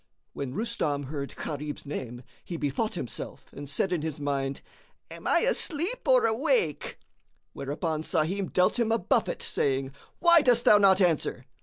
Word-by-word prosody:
When 135 -1 -5
Rustam 210 -11 -1
heard 140 0 -6
Gharib's 150 0 -5
name, 125 -3 -6 0.2
he 175 -3 -6
bethought 150 +10 -2
himself 125 -9 -6
and 145 -1 -8
said 185 +5 0
in 170 - -1
his 155 -1 -4
mind, 140 -1 -2 0.5
"Am - - -6
I - - +4
asleep 375 -3 0
or - - +5
awake?" 280 - 0 0.6
Whereupon 155 +3 -3
Sahim 180 +5 -1
dealt 185 +6 +2
him 230 -1 +1
a 225 - +3
buffet, 470 - 0
saying, 135 - -1 0.3
"Why 340 -1 +6
dost 245 -4 +3
thou 210 - +7
not 195 -1 +5
answer?" 160 -7 +1
165 Hz, 155 wpm, -27 LUFS, 140-230 Hz, 0.6 s, thou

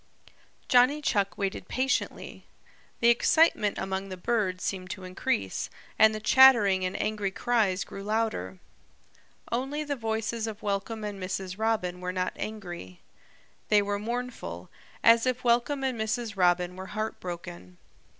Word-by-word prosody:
Johnny 255 +4 +5
Chuck 200 -10 0
waited 195 -2 -3
patiently. 265 +2 -2 0.6
The 235 - +6
excitement 235 -2 +3
among 190 0 -3
the 185 - -6
birds 185 -3 -1
seemed 185 -2 -3
to 190 0 -6
increase, 140 - -2 0.3
and 220 0 +6
the - - -3
chattering 215 -6 +6
and 185 +1 -2
angry 210 -2 -1
cries 200 -2 +1
grew 195 - -9
louder. 210 - -2 0.9
Only 270 +5 -1
the 290 -1 -2
voices 225 -1 -2
of 220 -1 -7
Welcome 205 +2 -2
and 205 -2 -5
Mrs. 185 +1 -4
Robin 195 -5 -1
were 180 0 -2
not 185 0 -2
angry. 175 - -7 0.7
They 210 -1 +5
were 205 0 -2
mournful, 225 - -5 0.3
as 230 +2 +6
if 255 0 -1
Welcome 245 +4 +2
and 255 -4 -1
Mrs. 220 0 -2
Robin 180 -1 +2
were 190 0 -7
heartbroken. 175 - -6
210 Hz, 140 wpm, -28 LUFS, 185-235 Hz, 0.9 s, The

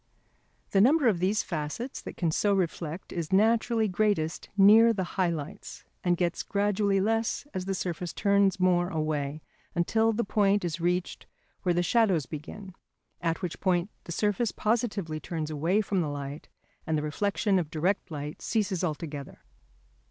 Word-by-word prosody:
The 195 - +4
number 275 +4 +5
of 200 -7 +2
these 195 +4 +1
facets 170 - -4
that - - -9
can 170 -3 +1
so 200 +5 +2
reflect 170 -2 -3
is 165 -3 -4
naturally 225 +2 +3
greatest 185 -5 0
near 220 +4 +7
the 190 -3 -1
high 185 -3 +2
lights, 170 +5 -6 0.2
and 175 -1 +2
gets 175 0 0
gradually 200 -1 +1
less 225 +6 0
as 185 -1 -3
the 195 0 -1
surface 175 -1 -3
turns 200 -2 +2
more 180 -1 +3
away; 155 -2 -2 0.3
until 220 +6 +2
the 230 +2 0
point 200 -1 +2
is 170 0 -3
reached 180 +1 -1 0.3
where 175 -3 +1
the 175 - +2
shadows 195 - +2
begin, 175 +7 -8 0.5
at 165 +1 -1
which 175 - -4
point 185 +1 +1
the - - -7
surface 210 +5 0
positively 210 -8 -1
turns 160 -2 -4
away 165 +8 +1
from 195 -3 0
the 155 - -1
light 145 0 -6 0.4
and 160 -1 +1
the 150 - -2
reflection 195 +5 +1
of 165 -4 -3
direct 175 +6 -1
light 150 -1 -6
ceases 200 -5 -1
altogether. 150 -3 -5
185 Hz, 160 wpm, -28 LUFS, 160-205 Hz, 0.5 s, near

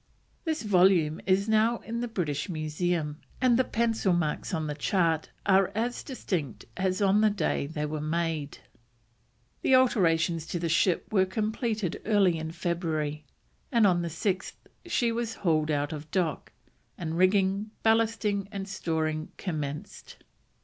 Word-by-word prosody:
This 315 -4 -1
volume 180 -6 +3
is 195 +2 +3
now 220 +2 +3
in 230 +1 -4
the 245 - -2
British 165 -7 -2
Museum, 155 -1 -2 0.2
and 250 -2 +4
the 260 - +4
pencil 225 -6 +1
marks 165 0 -1
on 160 -4 -1
the 150 - -2
chart 165 +1 0 0.2
are 195 -1 +4
as 240 +3 -1
distinct 155 - -4
as 190 +1 0
on 200 +2 +4
the 215 - +5
day 180 -7 -1
they 150 0 -3
were 150 0 -3
made. 155 -2 -2 1.0
The 265 - +4
alterations 165 -10 +2
to 175 - -3
the 170 - -1
ship 180 +5 +1
were 190 -2 +4
completed 215 -1 -2
early 195 -6 +3
in 160 0 -4
February, 160 -3 -2 0.5
and 230 -4 +4
on 175 -3 +3
the 170 - -2
6th 185 +4 -2 0.3
she 240 -8 +1
was 230 -1 -2
hauled 155 -4 +1
out 145 0 0
of 150 0 -7
dock, 165 -5 -1 0.5
and 165 -2 -4
rigging, 195 +3 +2
ballasting, 220 -3 +2
and 195 -1 -5
storing 160 -4 -2
commenced. 150 -5 -5
180 Hz, 150 wpm, -28 LUFS, 160-210 Hz, 1.0 s, the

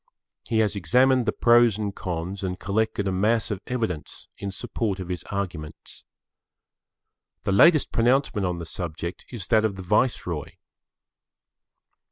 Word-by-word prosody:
He 115 - 0
has 105 0 -3
examined 125 +7 +3
the - - +3
pros 120 -3 +4
and 105 -2 -3
cons 90 +2 -4
and 90 0 -3
collected 100 0 -1
a - - +1
mass 110 +5 +1
of 100 -2 -3
evidence 110 -11 -4
in 100 - -5
support 100 -1 -3
of 95 -1 -6
his 90 -3 -4
arguments. 90 -6 -6 1.4
The - - 0
latest 155 - +5
pronouncement 120 -4 +2
on 90 -1 -2
the 85 - -6
subject 85 +1 -6
is 115 -8 -4
that 110 -2 +4
of 110 -3 0
the 95 - -7
Viceroy. 90 - 0
100 Hz, 145 wpm, -25 LUFS, 90-115 Hz, 1.4 s, latest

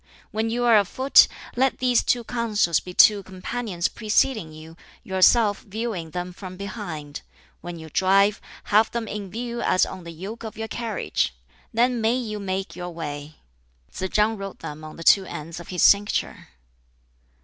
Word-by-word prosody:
When 220 +1 -1
you 240 +2 -1
are 230 -3 +6
afoot, 260 +7 +5 0.3
let 255 -1 +2
these 250 -2 +3
two 240 -1 +1
counsels 215 -8 +1
be 180 - -9
two 205 +3 +6
companions 190 0 -3
preceding 215 -4 0
you, 155 +1 -12 0.3
yourself 205 +2 +4
viewing 210 -5 -4
them 180 +2 -5
from 185 0 -9
behind; 175 -8 -6 0.4
when 175 -1 -7
you 160 -1 -9
drive, 195 +5 +3 0.3
have 215 +1 +5
them 235 -2 -4
in 205 -2 -5
view 235 +3 -4
as 185 - +3
on 185 -1 -8
the 170 - -9
yoke 195 +8 -8
of 220 -1 -7
your 225 0 -4
carriage. 215 - -2 0.4
Then 240 +1 +2
may 225 +2 +2
you 220 -4 -3
make 195 0 -4
your 180 0 -5
way." 150 -3 -6 0.6
Tsz 190 - -4
chang 215 +2 +2
wrote 195 -1 -7
them 150 +1 -7
on 155 0 -9
the 165 - -8
two 195 +3 +6
ends 165 -1 -7
of 170 - -11
his 180 -2 -1
cincture. 205 +1 +3
200 Hz, 170 wpm, -24 LUFS, 175-225 Hz, 0.6 s, are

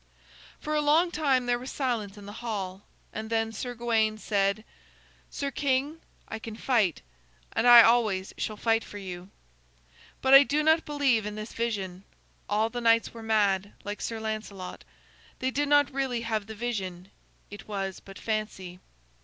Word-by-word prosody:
For 305 - -4
a 300 - +2
long 315 +4 +3
time 275 -6 +1
there 245 0 +1
was 255 +2 -7
silence 225 -7 -2
in 205 - -11
the 205 - -8
hall, 195 -5 -4 0.3
and 220 0 -5
then 225 -1 0
Sir 245 +3 -5
Gawain 225 -2 +1
said: 200 0 0 0.7
"Sir 280 -1 -3
king, 280 +3 -1 0.3
I 225 - -6
can 220 -1 -7
fight, 220 - +1 0.5
and 245 - +2
I 240 -1 +11
always 215 -5 +2
shall 215 - -4
fight 225 0 +1
for 205 - -10
you. 185 -2 -8 0.9
But 265 0 +3
I 275 - +12
do 290 +2 +1
not 320 +1 +4
believe 270 -8 +1
in 210 - -5
this 215 +1 -7
vision. 195 -6 -3 0.5
All 215 +2 +1
the 245 +1 -4
knights 230 0 +3
were 230 - -9
mad, 205 -3 +1
like 205 +1 -5
Sir 225 -1 -3
Lancelot. 215 -4 -5 0.5
They 260 0 -1
did 290 +2 -1
not 290 -1 +4
really 260 -3 -1
have 220 -3 -2
the 220 - -7
vision; 195 -5 -4 0.4
it 205 - -10
was 195 -2 -4
but 195 0 -13
fancy." 210 -5 -4
225 Hz, 170 wpm, -28 LUFS, 205-255 Hz, 0.9 s, I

